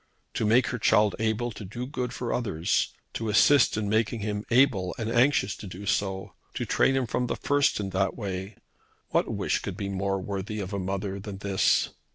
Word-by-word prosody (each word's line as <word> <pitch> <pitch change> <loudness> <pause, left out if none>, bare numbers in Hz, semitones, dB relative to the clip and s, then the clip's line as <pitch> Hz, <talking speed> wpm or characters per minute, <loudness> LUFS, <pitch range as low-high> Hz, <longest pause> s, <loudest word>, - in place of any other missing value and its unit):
To 110 - 0
make 120 +3 +4
her 125 - -3
child 105 -2 +3
able 110 +2 0
to 105 - -9
do 110 +6 -5
good 125 -2 -3
to 125 -1 -3
others, 100 -9 0 0.2
to 115 -1 -3
assist 120 +3 +5
in 105 -2 -1
making 110 +1 +1
him 105 0 -3
able 115 -8 +3
and 115 0 -3
anxious 120 -5 +3
to 105 - -8
do 95 +2 -8
so, 95 -1 -1 0.2
to - - -2
train 135 - +2
him 135 -1 +1
from 125 +2 -1
the - - -1
first 145 -4 +2
in 100 -2 -3
that 95 0 0
way, 95 -1 -5 0.5
what - - +1
wish - - 0
could - - -6
be 100 - -3
more 95 0 -1
worthy 100 +2 -4
of 100 0 -5
a 100 - -1
mother 95 +1 -3
than 100 0 -7
this? 100 -1 +2
105 Hz, 200 wpm, -27 LUFS, 95-120 Hz, 0.5 s, assist